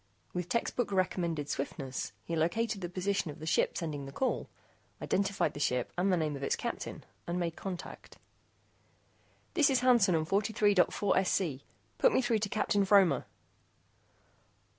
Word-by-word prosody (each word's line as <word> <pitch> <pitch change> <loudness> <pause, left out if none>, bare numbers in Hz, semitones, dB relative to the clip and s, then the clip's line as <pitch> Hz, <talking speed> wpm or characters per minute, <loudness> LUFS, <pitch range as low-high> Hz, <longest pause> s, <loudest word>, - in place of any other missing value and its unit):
With 180 -1 -3
textbook 235 +1 -1
recommended 170 -5 0
swiftness, 135 -2 -4
he 170 - -2
located 200 +6 0
the 175 - -4
position 185 0 -1
of 145 - -7
the 155 - -8
ship 160 - +1
sending 150 -4 -4
the - - -8
call, 260 - -1 0.5
identified 200 0 0
the - - -7
ship 125 -4 0
and 185 +2 +1
the 180 - +3
name 155 -3 -1
of 135 - -7
its 140 - +1
captain, - - -5 0.2
and 175 +1 -1
made 170 -2 -2
contact. 185 -3 -7 1.4
"This 305 -5 +4
is 260 -2 +2
Hansen 235 -8 +5
on 160 -1 +1
43.4SC. 195 - +2 0.4
Put - - +5
me 260 - +3
through 230 -3 +2
to 210 -1 -2
Captain 205 -1 +1
Fromer." 190 -8 +4
185 Hz, 150 wpm, -31 LUFS, 160-205 Hz, 1.4 s, Hansen